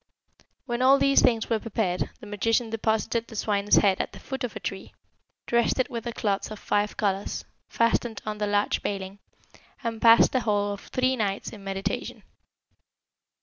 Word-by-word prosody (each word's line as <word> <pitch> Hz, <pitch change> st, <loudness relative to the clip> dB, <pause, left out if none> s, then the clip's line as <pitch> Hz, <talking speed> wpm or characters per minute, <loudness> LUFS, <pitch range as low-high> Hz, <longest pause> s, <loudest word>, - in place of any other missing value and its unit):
When 240 Hz, -2 st, -2 dB
all 265 Hz, +2 st, +6 dB
these 275 Hz, 0 st, +4 dB
things 230 Hz, -2 st, +2 dB
were 225 Hz, -2 st, +1 dB
prepared, 205 Hz, -5 st, -1 dB
the -, -, -9 dB
magician 225 Hz, +3 st, 0 dB
deposited 225 Hz, +1 st, 0 dB
the 225 Hz, -, -11 dB
swine's 205 Hz, -1 st, +2 dB
head 195 Hz, -3 st, +4 dB
at -, -, -6 dB
the -, -, -10 dB
foot 265 Hz, -1 st, -6 dB
of 245 Hz, -, -4 dB
a -, -, -4 dB
tree, -, -, -6 dB, 0.5 s
dressed 235 Hz, -1 st, +2 dB
it 255 Hz, -, 0 dB
with 235 Hz, -1 st, -5 dB
the 235 Hz, -, -2 dB
cloths 200 Hz, -3 st, -1 dB
of 215 Hz, -, -7 dB
five 205 Hz, +1 st, -1 dB
colours, 200 Hz, -2 st, -1 dB, 0.2 s
fastened 230 Hz, -1 st, +1 dB
on 210 Hz, -1 st, -4 dB
the 210 Hz, -, 0 dB
large 205 Hz, 0 st, +1 dB
baling, 195 Hz, 0 st, -4 dB, 0.6 s
and 230 Hz, -1 st, -3 dB
passed 230 Hz, 0 st, +7 dB
the 260 Hz, -, +2 dB
whole 205 Hz, -3 st, 0 dB
of 200 Hz, -, -8 dB
three 255 Hz, 0 st, +1 dB
nights 200 Hz, -4 st, -2 dB
in 205 Hz, -3 st, -11 dB
meditation. 195 Hz, 0 st, -4 dB
220 Hz, 180 wpm, -26 LUFS, 205-235 Hz, 0.6 s, passed